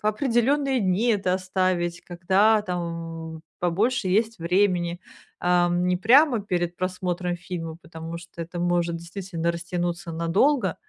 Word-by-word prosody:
определённые 265 Hz, +1 st, +1 dB
дни 195 Hz, +6 st, +2 dB
это 195 Hz, -3 st, 0 dB
оставить, 185 Hz, -2 st, -1 dB
когда, 190 Hz, +5 st, +3 dB
там, 165 Hz, -3 st, -5 dB, 0.2 s
побольше 200 Hz, +5 st, +1 dB
есть 220 Hz, +4 st, +1 dB
времени, 175 Hz, 0 st, +1 dB, 0.4 s
ам, 175 Hz, 0 st, +2 dB
не 180 Hz, -, +2 dB
прямо 240 Hz, -, +5 dB
перед 175 Hz, -3 st, -2 dB
просмотром 180 Hz, -1 st, -2 dB
фильма, 170 Hz, -2 st, -6 dB
потому 165 Hz, 0 st, -8 dB
что 170 Hz, 0 st, -10 dB
это 175 Hz, +1 st, -6 dB
может 175 Hz, -1 st, 0 dB
действительно 170 Hz, 0 st, -4 dB
растянуться 175 Hz, +1 st, -3 dB
надолго, 180 Hz, -, +2 dB
180 Hz, 120 wpm, -25 LUFS, 170-200 Hz, 0.4 s, прямо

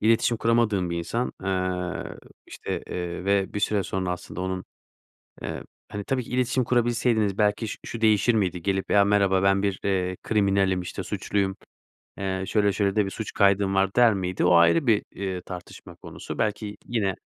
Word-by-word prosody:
İletişim 115 Hz, +2 st, +3 dB
kuramadığım 110 Hz, -5 st, +1 dB
bir 85 Hz, -, -2 dB
insan, 115 Hz, +9 st, -2 dB
eee, 90 Hz, -1 st, -2 dB, 0.3 s
işte, -, -, -5 dB
eee, 90 Hz, 0 st, -4 dB
ve 100 Hz, -1 st, +1 dB
bir 105 Hz, -, -2 dB
süre 105 Hz, -1 st, +1 dB
sonra 95 Hz, -1 st, -2 dB
aslında 90 Hz, 0 st, -7 dB
onun, 95 Hz, 0 st, -3 dB, 0.8 s
eee, -, -, -5 dB, 0.3 s
hani, 100 Hz, 0 st, -5 dB
tabii 130 Hz, +2 st, -1 dB
ki -, -, -13 dB
iletişim 125 Hz, +1 st, +1 dB
kurabilseydiniz 120 Hz, -4 st, +1 dB
belki 105 Hz, +1 st, +1 dB
ş -, -, -6 dB
şu 115 Hz, -, -6 dB
değişir 110 Hz, +1 st, +4 dB
miydi? 90 Hz, -5 st, 0 dB
Gelip 95 Hz, +1 st, -1 dB
"Ya 100 Hz, -1 st, +5 dB
merhaba 100 Hz, -2 st, +3 dB
ben 95 Hz, 0 st, +3 dB
bir, 100 Hz, -2 st, -1 dB
eee, 95 Hz, -2 st, 0 dB
kriminalim 100 Hz, -3 st, +2 dB
işte 90 Hz, -, -5 dB
suçluyum, 95 Hz, -2 st, -1 dB, 0.6 s
eee, 95 Hz, -1 st, -2 dB
şöyle 105 Hz, -1 st, +2 dB
şöyle 100 Hz, 0 st, 0 dB
de 105 Hz, -, +4 dB
bir -, -, -4 dB
suç 110 Hz, +2 st, -6 dB
kaydım 100 Hz, -1 st, +3 dB
var." 95 Hz, 0 st, +2 dB
der 120 Hz, -3 st, +6 dB
miydi 90 Hz, -2 st, -2 dB
o 90 Hz, -, +5 dB
ayrı 85 Hz, -, +5 dB
bir, 110 Hz, -3 st, +3 dB
eee, 95 Hz, -2 st, -4 dB
tartışma 90 Hz, -1 st, -10 dB
konusu -, -, -8 dB
belki 105 Hz, -1 st, -2 dB
yine 105 Hz, -5 st, 0 dB
100 Hz, 175 wpm, -25 LUFS, 95-110 Hz, 0.8 s, der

